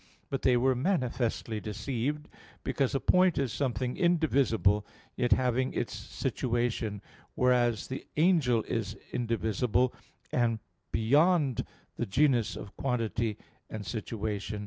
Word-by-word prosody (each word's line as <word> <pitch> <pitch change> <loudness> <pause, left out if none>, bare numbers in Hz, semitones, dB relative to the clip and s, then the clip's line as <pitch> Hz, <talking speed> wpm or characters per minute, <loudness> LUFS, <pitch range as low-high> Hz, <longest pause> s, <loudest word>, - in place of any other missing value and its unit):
But 135 - -1
they 125 -2 +4
were 130 +2 +3
manifestly 125 - -1
deceived, 125 +7 -3 0.4
because 135 -1 0
a - - +2
point 180 +2 +4
is 135 -5 0
something 130 -2 -1
indivisible, 140 - +3 0.3
yet 120 -1 0
having 130 +2 +2
its - - -2
situation; 115 -4 -2 0.3
whereas 120 -3 +2
the 130 - -6
angel 150 -9 +3
is 110 -2 -3 0.2
indivisible, 115 0 +1 0.4
and 120 -2 +2 0.3
beyond 140 +3 +3 0.3
the 120 - -2
genus 125 +1 +2
of 100 - -9
quantity 115 -4 -1 0.3
and 110 -2 -6
situation. 105 -2 -3
125 Hz, 115 wpm, -30 LUFS, 110-135 Hz, 0.4 s, they